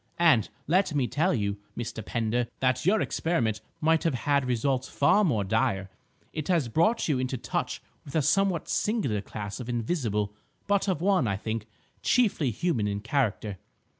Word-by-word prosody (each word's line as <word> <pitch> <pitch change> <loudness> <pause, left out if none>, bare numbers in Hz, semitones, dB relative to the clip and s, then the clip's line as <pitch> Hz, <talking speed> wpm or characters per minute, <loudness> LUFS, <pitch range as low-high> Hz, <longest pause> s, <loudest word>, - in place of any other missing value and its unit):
And, 155 - +4 0.2
let 175 0 +2
me 135 -3 +2
tell 160 +9 +1
you, 100 -4 -1 0.2
Mr. 115 -2 -4
Pender, 115 +2 -1
that 130 +4 +1
your 215 +3 +4
experiment 115 -11 0 0.2
might 160 +1 +3
have 165 -5 +1
had 140 +2 +1
results 125 +2 0
far 150 +9 +4
more 115 - +2
dire. 95 -2 0 0.4
It 155 -2 -4
has 165 -9 +2
brought 215 - +2
you 145 -5 +1
into 130 0 -2
touch - - -3 0.2
with 140 - -10
a 155 - +3
somewhat 180 +3 +2
singular 200 - 0
class 105 +1 -6
of 125 -1 -6
Invisible, 115 - -1 0.3
but 200 0 +1
of 185 -5 0
one, 190 - +3
I 100 -2 0
think, 110 +1 -4 0.3
chiefly 205 - +2
human 120 - 0
in 100 0 -2
character. 110 -6 -1
130 Hz, 165 wpm, -28 LUFS, 110-165 Hz, 0.4 s, And